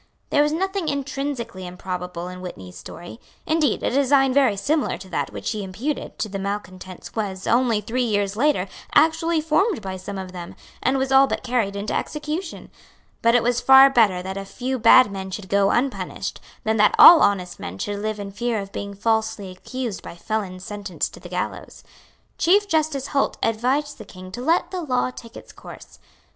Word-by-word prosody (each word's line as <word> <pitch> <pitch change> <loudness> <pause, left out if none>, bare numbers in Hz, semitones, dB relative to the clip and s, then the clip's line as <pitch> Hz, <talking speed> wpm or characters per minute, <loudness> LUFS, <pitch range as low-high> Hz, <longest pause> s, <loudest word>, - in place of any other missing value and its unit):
There 290 - +4
was 295 0 +2
nothing 385 +2 -2
intrinsically 275 -9 -4
improbable 180 -1 -5
in 180 0 -8
Whitney's 95 - -9
story. 175 - -10 0.3
Indeed 310 -6 +1
a - - 0
design 270 0 +3
very 260 -7 +3
similar 300 +7 0
to 190 - -11
that - - -2
which - - -4
he 215 -2 -4
imputed 230 +11 -4
to - - -2
the 200 -1 -5
malecontents 190 -2 -6
was, 195 -4 -3
only 235 -3 +2
three 245 +4 -2
years 205 -4 0
later, 265 -5 +1 0.3
actually 325 +1 +3
formed 320 - +1
by 190 -1 -5
some 195 +2 -7
of 190 -1 -6
them, 175 -1 -8 0.3
and 265 +2 +1
was 265 0 -1
all 270 +1 +6
but - - -3
carried 235 -5 0
into 200 +1 -3
execution. 310 +4 -4 0.5
But 230 +1 +4
it 245 - +4
was 245 +1 +1
far 265 +2 +8
better 205 -8 +3
that 190 +1 -5
a 195 - -4
few 255 +6 -4
bad 230 0 +7
men 190 -1 -5
should 190 0 -7
go 200 0 +3
unpunished 260 +2 -2 0.2
than 220 0 0
that 210 0 +4
all 340 - +10
honest 185 -3 +1
men 90 +2 -7
should 205 - -3
live 215 0 -3
in 200 -1 -6
fear 235 +3 -2
of 195 0 -7
being 200 0 -6
falsely 220 -2 -1
accused 235 +3 -5
by - - -9
felons 185 -1 -4
sentenced 205 -2 -4
to - - -11
the - - -11
gallows. - - -5 0.6
Chief 405 +4 +4
Justice 310 -6 0
Holt 275 - 0
advised 260 +7 0
the - - -9
King 185 0 -11
to 240 - -6
let 325 +7 +1
the 370 -2 -3
law 255 -5 0
take 230 -2 -12
its - - -13
course. - - -13
225 Hz, 190 wpm, -23 LUFS, 195-275 Hz, 0.6 s, all